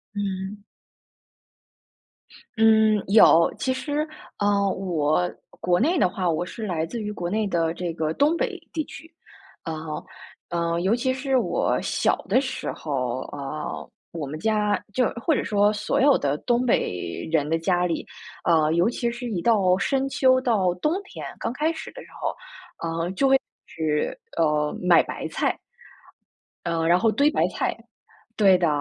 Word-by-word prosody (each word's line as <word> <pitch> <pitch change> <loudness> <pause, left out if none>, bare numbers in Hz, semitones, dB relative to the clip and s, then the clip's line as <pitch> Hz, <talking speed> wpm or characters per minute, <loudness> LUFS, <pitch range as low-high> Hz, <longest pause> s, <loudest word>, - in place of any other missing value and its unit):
嗯。 200 0 -4 1.9
嗯， 220 -1 +5
有， 185 -5 +6
其 260 - 0
实， 290 +3 -2 0.3
呃， 200 -1 +2
我 175 -2 0 0.3
国 175 +1 +2
内 335 +8 +2
的 185 - +3
话， 185 -2 -1
我 165 +2 0
是 220 +4 -6
来 165 -5 -1
自 230 +8 -6
于 210 0 -3
国 175 -4 -4
内 215 +2 0
的 165 -3 0
这 175 -1 -4
个 155 -1 -1
东 295 +4 +3
北 380 0 -2
地 315 - -1
区。 325 +2 -12 0.5
呃， 155 -1 -5 0.5
呃， 170 0 -1
尤 190 +4 +2
其 260 +1 0
是 265 0 0
我 245 - +1
小 - - +1
的 255 - +3
时 260 -1 -4
候 130 -5 -2
啊， 145 +2 -5 0.5
我 165 -3 -4
们 155 - -5
家 210 +1 +1 0.2
就 250 +1 +2 0.2
或 325 - +4
者 - - 0
说 205 0 +3
所 235 +6 -1
有 280 0 +6
的 145 0 -1
东 245 0 +1
北 90 - -1
人 150 -3 +2
的 165 - +2
家 175 +2 +1
里， 170 -2 -2 0.4
呃， 155 -2 +3
尤 175 +6 +3
其 240 0 -1
是 240 +1 -5
一 185 -6 -2
到 190 -5 +3
深 270 +6 0
秋、 260 -1 +3
到 200 -8 +2
冬 300 - 0
天， - - -9
刚 230 - -2
开 305 +5 0
始 320 - -7
的 - - -9
时 - - -17
候， - - -2 0.5
呃， 165 +1 -2
就 270 +8 +1
会 270 0 +5 0.3
吃 155 - -1 0.2
呃， 150 -2 +1
买 180 -2 +6
白 - - -6
菜。 - - -1 1.1
呃， 165 -1 -1
然 175 +2 +5
后 225 - +3
堆 285 +7 +3
白 - - +2
菜， - - -2 0.6
对 195 -3 +6
的， 175 -1 +2
195 Hz, 175 characters per minute, -24 LUFS, 165-245 Hz, 1.9 s, 有